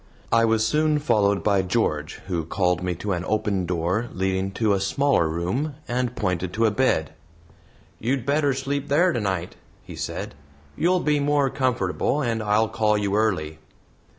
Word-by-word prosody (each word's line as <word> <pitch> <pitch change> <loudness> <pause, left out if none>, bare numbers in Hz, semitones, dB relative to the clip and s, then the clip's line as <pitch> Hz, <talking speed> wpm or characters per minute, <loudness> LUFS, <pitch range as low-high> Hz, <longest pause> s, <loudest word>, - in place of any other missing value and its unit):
I 115 0 +4
was 110 -1 +2
soon 150 +4 +2
followed 100 -8 +2
by 100 -2 +3
George, 90 -6 -1
who 85 -3 -2
called 90 +1 0
me 90 -1 -2
to 100 +4 -4
an 90 -1 -1
open 100 -4 0
door 90 +7 -1
leading 95 0 -1
to 110 0 +1
a 100 - +1
smaller 135 - +2
room, 95 - -2
and 125 0 -1
pointed 90 0 -2
to 115 +1 +2
a 110 - +3
bed. 105 - +1 0.9
"You'd 125 +1 -1
better 140 -1 +2
sleep 140 +1 -3
there 170 +5 +3
tonight," 95 -5 -2 0.3
he - - -10
said; - - -5 0.4
"you'll 180 +2 +2
be 150 -1 +2
more 145 -2 +2
comfortable, 130 -2 0
and 115 -5 -1
I'll 105 +1 +2
call 105 -1 +1
you 100 -1 -1
early." 90 -8 0
110 Hz, 165 wpm, -24 LUFS, 95-135 Hz, 0.9 s, I